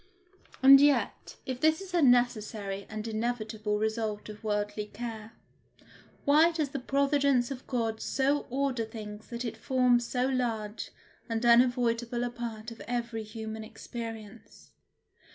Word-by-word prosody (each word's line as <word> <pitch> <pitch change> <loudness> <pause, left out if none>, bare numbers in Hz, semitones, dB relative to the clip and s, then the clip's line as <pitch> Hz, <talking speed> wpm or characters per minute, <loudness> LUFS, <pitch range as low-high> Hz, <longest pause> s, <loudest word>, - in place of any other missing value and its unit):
And 275 +1 +10
yet, 290 -1 +1
if 255 -2 -4
this 315 0 +4
is 385 -2 -9
a 345 - +3
necessary 215 -6 +1
and 215 0 -5
inevitable 220 -2 -2
result 220 -1 -2
of 210 +1 -10
worldly 210 0 -2
care, 220 0 -7 0.9
why 310 +4 +6
does 310 -4 -1
the 275 - -4
providence 275 -1 +2
of 260 -1 -7
God 225 -3 -1
so 280 +2 0
order 260 -2 0
things 215 -1 -8
that 235 +1 -5
it 230 - -4
forms 250 -3 +2
so 250 0 0
large 230 -5 -2 0.4
and 230 +1 -1
unavoidable 240 0 +3
a 245 - -2
part 235 -1 -6
of 230 - -11
every 235 -2 -2
human 220 0 -6
experience? 225 -1 -9
235 Hz, 135 wpm, -29 LUFS, 220-255 Hz, 0.9 s, And